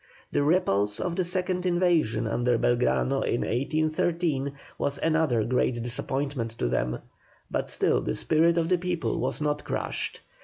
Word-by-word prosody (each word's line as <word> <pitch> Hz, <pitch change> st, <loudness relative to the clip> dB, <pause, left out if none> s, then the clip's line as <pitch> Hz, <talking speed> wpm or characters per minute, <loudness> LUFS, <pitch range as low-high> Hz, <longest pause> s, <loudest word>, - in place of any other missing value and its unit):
The 145 Hz, -, +1 dB
repulse 105 Hz, -, +2 dB
of 175 Hz, -2 st, -2 dB
the 185 Hz, -, +1 dB
second 180 Hz, +1 st, -1 dB
invasion 175 Hz, -11 st, +2 dB
under 120 Hz, +2 st, +1 dB
Belgrano 125 Hz, +3 st, +1 dB
in 120 Hz, -, 0 dB
1813 155 Hz, +2 st, 0 dB, 0.3 s
was 140 Hz, 0 st, 0 dB
another 155 Hz, -8 st, +1 dB
great 120 Hz, 0 st, 0 dB
disappointment 125 Hz, -1 st, -2 dB
to -, -, 0 dB
them, -, -, -1 dB, 0.5 s
but -, -, -1 dB
still -, -, +2 dB
the 60 Hz, -, -2 dB
spirit 165 Hz, -, +2 dB
of 165 Hz, -1 st, +1 dB
the 180 Hz, 0 st, +2 dB
people 175 Hz, -1 st, -2 dB
was -, -, -1 dB
not 150 Hz, 0 st, -1 dB
crushed. -, -, -3 dB
145 Hz, 150 wpm, -27 LUFS, 120-170 Hz, 0.5 s, repulse